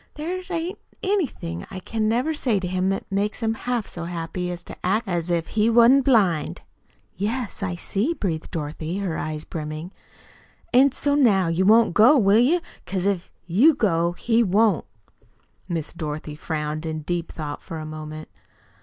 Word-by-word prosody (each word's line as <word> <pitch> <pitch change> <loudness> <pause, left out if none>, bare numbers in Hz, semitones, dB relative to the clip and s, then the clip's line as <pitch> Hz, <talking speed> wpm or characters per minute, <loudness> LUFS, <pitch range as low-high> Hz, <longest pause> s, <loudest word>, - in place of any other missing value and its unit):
There 345 +5 -3
ain't 350 +2 -3 0.2
anything 295 - -2
I 190 - -6
can 215 +3 -1
ever 255 +7 +1
say 245 -9 0
to 185 - -4
him 185 +1 0
that 195 - -2
makes 205 +4 -1
him 225 0 +1
half 240 -1 -2
so 170 -1 -7
happy 175 +1 -4
as 175 -1 -5
to - - -10
act 210 +5 +1
as 175 -2 -1
if 170 -2 0
he 215 +1 +2
wa'n't 240 +4 +6
blind." 190 - +2 0.5
"Yes, 220 +4 -3
I 185 -3 -2
see," 210 - -1
breathed 165 - -3
Dorothy, 155 +2 -4
her 190 -5 -2
eyes 155 -1 -4
brimming. 155 +2 -6 0.8
"An' 265 +3 +6
so 285 +2 0
now 205 -11 +4
you 180 +3 +1
won't 225 -2 +5
go, 235 - +7
will 205 -2 +5
you? 310 +9 +3 0.2
Because 185 -1 -3
if 195 -3 -1
you 240 - +5
go, 170 -8 +1
he 230 +5 +1
won't." 210 -2 +3 0.8
Miss 165 -3 -3
Dorothy 155 -2 -5
frowned 155 0 -3
in 160 -1 -3
deep 175 +1 -3
thought 150 -2 -6
for 165 - -7
a 155 - -6
moment. 155 0 -7
190 Hz, 170 wpm, -24 LUFS, 165-230 Hz, 0.8 s, go